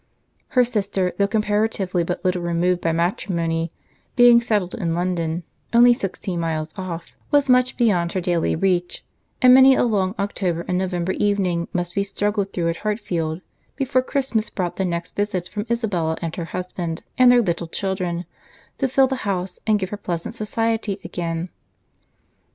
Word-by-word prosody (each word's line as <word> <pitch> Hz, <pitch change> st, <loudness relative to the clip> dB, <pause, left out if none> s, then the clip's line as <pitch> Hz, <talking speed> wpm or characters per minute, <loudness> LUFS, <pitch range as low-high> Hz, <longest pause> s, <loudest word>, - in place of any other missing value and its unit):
Her 250 Hz, -, +8 dB
sister, 200 Hz, -6 st, 0 dB
though 200 Hz, -, +4 dB
comparatively 210 Hz, -3 st, 0 dB
but 175 Hz, +2 st, -4 dB
little 180 Hz, -1 st, +1 dB
removed 175 Hz, +1 st, +1 dB
by 165 Hz, -, +1 dB
matrimony, 165 Hz, -1 st, -1 dB, 0.4 s
being 245 Hz, -2 st, +7 dB
settled 210 Hz, -6 st, 0 dB
in 165 Hz, -2 st, -2 dB
London, 170 Hz, -1 st, -1 dB, 0.3 s
only 240 Hz, +1 st, +7 dB
sixteen 190 Hz, -5 st, -4 dB
miles 160 Hz, -1 st, -2 dB
off, 180 Hz, -3 st, -6 dB
was 290 Hz, -2 st, +3 dB
much 250 Hz, 0 st, +3 dB
beyond 180 Hz, -8 st, +2 dB
her 185 Hz, -, 0 dB
daily 175 Hz, -2 st, 0 dB
reach; 180 Hz, 0 st, 0 dB, 0.4 s
and 250 Hz, 0 st, +9 dB
many 265 Hz, +1 st, +8 dB
a -, -, +2 dB
long 200 Hz, -4 st, +1 dB
October 185 Hz, -4 st, -2 dB
and 180 Hz, 0 st, 0 dB
November 180 Hz, -1 st, -1 dB
evening 190 Hz, -5 st, 0 dB
must 175 Hz, -1 st, -2 dB
be 200 Hz, -, +1 dB
struggled 200 Hz, 0 st, -1 dB
through 170 Hz, -2 st, -1 dB
at 165 Hz, -, -2 dB
Hartfield, 180 Hz, -6 st, -2 dB, 0.3 s
before 270 Hz, -1 st, +1 dB
Christmas 255 Hz, -4 st, -1 dB
brought 180 Hz, -3 st, -3 dB
the 190 Hz, -, 0 dB
next 170 Hz, -1 st, -4 dB
visit 195 Hz, -3 st, -1 dB
from 210 Hz, +1 st, -5 dB
Isabella 190 Hz, -9 st, 0 dB
and 165 Hz, -1 st, -4 dB
her 170 Hz, -, -4 dB
husband, 175 Hz, -2 st, -5 dB, 0.2 s
and 250 Hz, -1 st, +8 dB
their 245 Hz, -1 st, +5 dB
little 170 Hz, -3 st, -2 dB
children, 180 Hz, -1 st, -3 dB, 0.5 s
to 270 Hz, -, +2 dB
fill 265 Hz, +1 st, +4 dB
the 265 Hz, 0 st, -2 dB
house, 190 Hz, -5 st, -3 dB
and 215 Hz, -1 st, +4 dB
give 190 Hz, -2 st, -3 dB
her 205 Hz, -, -3 dB
pleasant 175 Hz, -1 st, -4 dB
society 225 Hz, -2 st, -1 dB
again. 170 Hz, 0 st, -3 dB
185 Hz, 165 wpm, -22 LUFS, 170-215 Hz, 0.5 s, and